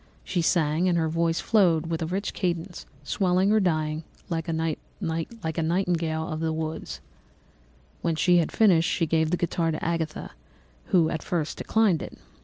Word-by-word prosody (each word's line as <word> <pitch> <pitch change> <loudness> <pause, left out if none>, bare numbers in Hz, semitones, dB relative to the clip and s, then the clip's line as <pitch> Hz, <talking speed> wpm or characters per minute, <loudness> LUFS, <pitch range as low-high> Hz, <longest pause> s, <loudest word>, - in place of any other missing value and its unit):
She 175 - -1
sang, 165 +1 +2
and 175 - +2
her 160 -1 +1
voice 165 +1 +1
flowed 175 -7 +3
in 165 0 -1
a - - -2
rich 195 +3 -2
cadence, 175 0 -3 0.2
swelling 185 +5 +2
or 215 - +5
dying 155 -4 0 0.3
away 165 -1 -1 0.7
like 160 0 -3
a - - +1
nightingale 165 -2 0
of 155 -3 -4
the 160 0 0
woods. 160 0 -4 1.0
"When 165 - 0
she 175 +3 +4
had 170 - +1
finished, 185 -6 +4
she 170 - +1
gave 160 0 +1
the 175 - +1
guitar 170 -1 0
to 155 - -3
Agatha, 165 -2 -2 0.5
who 170 -4 +3
at 160 - -3
first 160 -4 -2
declined 215 -8 +2
it. - - -8
165 Hz, 170 wpm, -26 LUFS, 160-180 Hz, 1.0 s, or